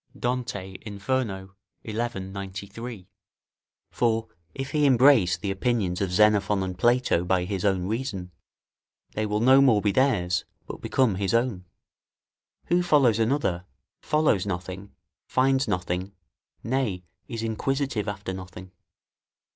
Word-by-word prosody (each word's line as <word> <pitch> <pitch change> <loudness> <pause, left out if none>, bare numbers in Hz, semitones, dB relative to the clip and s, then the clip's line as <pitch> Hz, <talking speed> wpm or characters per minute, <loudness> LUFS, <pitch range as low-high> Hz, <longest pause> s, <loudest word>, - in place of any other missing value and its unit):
Dante, 115 -7 -3
Inferno, 100 -2 -3 0.3
xi. 110 - -5
93] 100 -1 -5 0.8
for, 115 -2 0 0.3
if 135 0 -5
he 150 -1 +3
embrace 130 -7 +5
the 100 -2 -3
opinions 95 -3 -1
of 95 -2 -1
Xenophon 105 0 +3
and 95 -1 -4
Plato, 120 -4 +2
by 90 0 +1
his 95 -1 -3
own 95 -3 +1
reason, 105 -4 -3 0.8
they 110 0 -2
will 105 +1 -1
no 130 +3 +6
more 125 -6 +5
be 105 0 +1
theirs, 95 -9 +2 0.2
but - - -8
become 130 -6 +2
his 100 +1 0
own. 115 -6 0 1.0
Who 175 +1 +3
follows 140 - +3
another, 110 -7 0 0.4
follows 150 -11 +1
nothing, 95 +2 -5 0.4
finds 135 +1 +2
nothing, 90 +2 -2 0.5
nay, 115 -8 -1 0.2
is 115 -4 -5
inquisitive 115 0 -1
after 100 -2 -4
nothing. 95 0 -9
105 Hz, 125 wpm, -26 LUFS, 95-125 Hz, 1.0 s, no